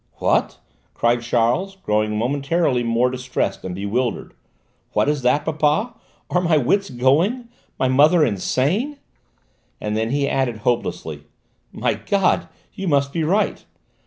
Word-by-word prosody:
"What?" -, -, +1 dB, 0.4 s
cried 120 Hz, 0 st, +2 dB
Charles, 120 Hz, +11 st, 0 dB
growing 105 Hz, -, -1 dB
momentarily 140 Hz, +3 st, 0 dB
more 120 Hz, +2 st, +1 dB
distressed 130 Hz, 0 st, -3 dB
and 90 Hz, -1 st, -5 dB
bewildered; 110 Hz, +6 st, -2 dB, 0.6 s
"what -, -, +2 dB
is 145 Hz, -1 st, 0 dB
that, 145 Hz, +4 st, +2 dB
papa? 160 Hz, +9 st, +1 dB, 0.4 s
Are 180 Hz, -, +2 dB
my 170 Hz, -3 st, +3 dB
wits 195 Hz, +9 st, +1 dB
going? 165 Hz, -, +1 dB, 0.3 s
My 130 Hz, -, +1 dB
mother 150 Hz, +5 st, +5 dB
insane?" 165 Hz, -, 0 dB, 0.8 s
And 105 Hz, 0 st, -3 dB
then 110 Hz, +1 st, 0 dB
he 140 Hz, +2 st, 0 dB
added 130 Hz, -5 st, 0 dB
hopelessly: 120 Hz, -1 st, -2 dB, 0.5 s
"My -, -, 0 dB
God! 195 Hz, -2 st, +1 dB, 0.3 s
You 195 Hz, -, -5 dB
must 140 Hz, -3 st, +1 dB
be 165 Hz, -, -1 dB
right! 195 Hz, +7 st, 0 dB
140 Hz, 130 wpm, -21 LUFS, 120-170 Hz, 0.8 s, mother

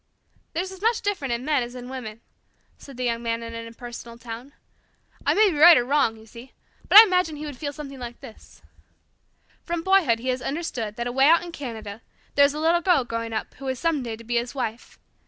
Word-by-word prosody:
"There's 365 Hz, +3 st, -3 dB
as 380 Hz, 0 st, -12 dB
much 455 Hz, +1 st, +1 dB
difference 380 Hz, -11 st, -2 dB
in 240 Hz, +2 st, -6 dB
men 295 Hz, -3 st, +2 dB
as 240 Hz, +1 st, -6 dB
in 250 Hz, 0 st, -8 dB
women," 235 Hz, -4 st, -7 dB, 0.6 s
said 275 Hz, -3 st, -12 dB
the 255 Hz, -, -3 dB
Young 235 Hz, -1 st, -1 dB
Man 230 Hz, 0 st, -2 dB
in 230 Hz, 0 st, -7 dB
an 230 Hz, 0 st, -6 dB
impersonal 235 Hz, 0 st, -10 dB
tone. 235 Hz, +3 st, -9 dB, 0.8 s
"I -, -, +4 dB
may 425 Hz, -2 st, +5 dB
be 305 Hz, -, -4 dB
right 335 Hz, +1 st, +9 dB
or 245 Hz, -, +1 dB
wrong, 270 Hz, -4 st, +1 dB
you 220 Hz, -, -15 dB
see, 235 Hz, +3 st, -13 dB, 0.4 s
but -, -, +8 dB
I 435 Hz, -, +14 dB
imagine 365 Hz, -6 st, +1 dB
he 300 Hz, +1 st, -7 dB
would 290 Hz, -2 st, -6 dB
feel 285 Hz, -2 st, -3 dB
something 280 Hz, -2 st, -9 dB
like 240 Hz, -1 st, -8 dB
this: 220 Hz, -, -15 dB, 1.0 s
From 340 Hz, -1 st, -3 dB
boyhood 380 Hz, -11 st, +3 dB
he 250 Hz, +3 st, -4 dB
has 255 Hz, 0 st, -1 dB
understood 250 Hz, -8 st, -4 dB
that 235 Hz, 0 st, -4 dB
away 265 Hz, +3 st, +3 dB
out 335 Hz, +2 st, +5 dB
in 350 Hz, -, -8 dB
Canada 225 Hz, -8 st, -7 dB, 0.3 s
there 285 Hz, -, +6 dB
is 285 Hz, +1 st, 0 dB
a -, -, -4 dB
little 335 Hz, +2 st, +2 dB
girl 345 Hz, -6 st, +3 dB
growing 230 Hz, -1 st, -4 dB
up 220 Hz, -, -4 dB
who 275 Hz, -, -7 dB
is 260 Hz, -1 st, -2 dB
some 325 Hz, 0 st, 0 dB
day 230 Hz, -3 st, -5 dB
to 230 Hz, -, -13 dB
be 240 Hz, +1 st, -1 dB
his 240 Hz, +3 st, -3 dB
wife. 240 Hz, -3 st, -5 dB
255 Hz, 230 wpm, -24 LUFS, 235-315 Hz, 1.0 s, I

